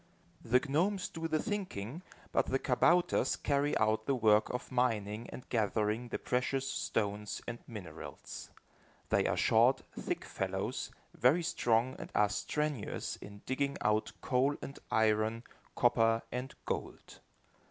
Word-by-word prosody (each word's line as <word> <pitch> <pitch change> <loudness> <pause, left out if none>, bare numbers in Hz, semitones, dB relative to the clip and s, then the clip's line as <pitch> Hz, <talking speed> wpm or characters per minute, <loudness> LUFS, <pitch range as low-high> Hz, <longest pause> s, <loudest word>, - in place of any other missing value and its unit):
The 125 +2 +4
gnomes 180 +6 +1
do 165 0 -4
the 155 -1 +1
thinking, 180 - -3 0.3
but - - +2
the 135 - +2
kabouters 170 +7 +3
carry 145 0 +1
out 110 0 +1
the 140 - +3
work 110 -3 +4
of 125 +2 -4
mining 115 -3 0
and 125 - -9
gathering 110 +1 0
the - - -3
precious 130 +2 0
stones 105 -1 -2
and 120 - -4
minerals. 105 -7 -8 0.6
They - - +3
are - - 0
short, - - +4
thick - - -3
fellows, - - -2 0.2
very 145 +9 +4
strong 120 -5 +2
and - - -7
are 105 -1 +4
strenuous 150 +3 -2
in 100 0 -11
digging 140 +2 -1
out 105 +1 +2
coal 135 +2 +2
and 140 - -8
iron, 110 +1 +2 0.3
copper 115 -2 +3
and 125 +2 -4
gold. - - -5
120 Hz, 135 wpm, -33 LUFS, 110-140 Hz, 0.6 s, The